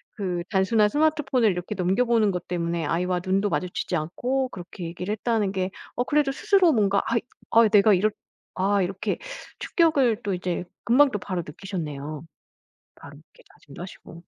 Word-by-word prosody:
그 180 -5 -2
단순한 210 +2 +3
스마트폰을 290 -5 +2
이렇게 180 +3 -4
넘겨보는 215 +3 +2
것 180 -1 -5
때문에 170 -2 -2
아이와 180 +3 0
눈도 195 +2 +1
마주치지 180 0 -2
않고 245 +12 -1
그렇게 180 -3 -8
얘기를 180 +4 -5
했다는 220 -2 0
게 190 -1 -2 0.2
어 245 - +1
그래도 290 0 +1
스스로 365 +3 +3
뭔가 200 -5 +2
아이 230 - +1 0.3
아 230 0 +6
내가 210 0 +6
이렇 205 +4 +3 0.5
아 195 +1 +2
이렇게 195 +3 -2 0.4
충격을 275 - +2
또 200 - -1
이제 180 -1 -2 0.2
금방 275 +4 +5
또 210 - -1
바로 185 -2 -3
느끼셨네요. 155 -4 -6 0.7
바로 145 - -13
이렇게 155 - -22
다짐도 140 +2 -14
하시고. 170 -2 -11
195 Hz, 365 characters per minute, -25 LUFS, 180-230 Hz, 0.7 s, 아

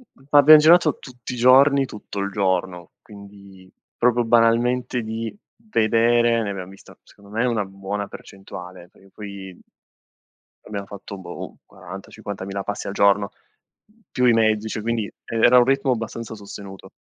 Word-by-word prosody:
mhmm, 135 - -23
abbiam 145 +2 +9
girato 160 0 +5
tutti 125 -2 -9
i - - -5
giorni 135 +3 +5
tutto 105 -4 -8
il 100 +1 -2
giorno, 95 -3 -2
quindi 100 -2 -15 0.3
proprio 120 0 +2
banalmente 120 +2 +2
di 110 0 -5 0.3
vedere, 115 - +2
ne 105 - -3
abbiam 95 -2 -7
vista 95 - -16
secondo 100 0 -19
me 115 +3 0
una 115 -4 0
buona 100 +1 -5
percentuale, 90 -3 -11
perché 95 - -22
poi 100 -3 -10 1.1
abbiamo 100 -2 -6
fatto 100 0 -9
boh, 85 -2 -9
40-50000 100 -1 -8
passi 105 - -5
al 100 - -4
giorno, 100 0 +2 0.8
più 125 - +1
i 120 - +5
mezzi, 110 -1 +2
cioè 110 - -4
quindi 115 -1 -2
e 115 - -8
era 120 +2 +6
un 125 - +7
ritmo 135 0 +1
abbastanza 115 0 -6
sostenuto. 100 -2 -11
110 Hz, 150 wpm, -22 LUFS, 100-120 Hz, 1.1 s, abbiam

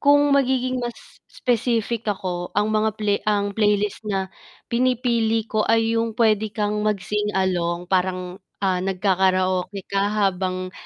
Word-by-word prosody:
kung 290 0 +4
magiging 255 -2 +1
mas 240 -1 -4 0.3
specific 235 -2 -1
ako 180 -3 -3
ang 210 +1 +2
mga 215 0 +2
play 205 -2 +1
ang 205 -1 +1
playlist 210 -1 +1
na 190 -2 -2 0.4
pinipili 235 -2 +1
ko 215 -1 -1
ay 225 0 +3
yung 230 -1 -1
puwede 220 -2 +3
kang 210 0 0
mag-sing 210 0 -1
along 175 -2 0
parang, 185 0 -1 0.2
ah, 185 -2 +1
nagkakaraoke 185 0 0
ka 195 - +2 0.2
habang 185 -1 -1
210 Hz, 135 wpm, -23 LUFS, 190-225 Hz, 0.4 s, kung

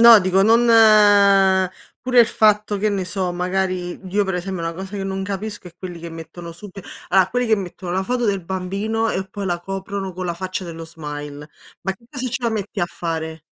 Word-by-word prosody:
No, 235 -1 +10
dico 185 +1 +2
non 230 +3 +5 1.3
pure 250 -1 +4
il 230 - +6
fatto 210 -2 +2
che 215 - +1
ne 200 -2 -1
so, 185 0 -2
magari, 180 0 -2
io 200 +2 +1
per 190 -1 -2
esempio 180 -1 -4
una 165 - -2
cosa 190 +4 -7
che 195 - -3
non 195 0 -3
capisco 200 0 -5
è 175 - -12
quelli 180 -2 -7
che 170 - -7
mettono 165 +1 -9
sub 190 +4 -11 0.4
allora 190 0 +4
quelli 245 +3 0
che 220 -1 +3
mettono 180 -1 -6
la 190 - 0
foto 245 +3 -1
del 195 -4 0
bambino 195 +5 -2
e 190 0 -2
poi 200 +1 -6
la 175 -1 -1
coprono 195 +1 -5
con 185 +1 -5
la 175 - -1
faccia 185 +2 -4
dello 165 -1 -7
smile. 150 -2 -8 0.3
Ma 190 - -1
che 215 - -26
cosa 260 -1 -5
ce 250 +1 -4
la 235 - +2
metti 210 -1 -3
a 175 - +1
fare? 160 -2 -4
190 Hz, 215 wpm, -21 LUFS, 175-210 Hz, 1.3 s, No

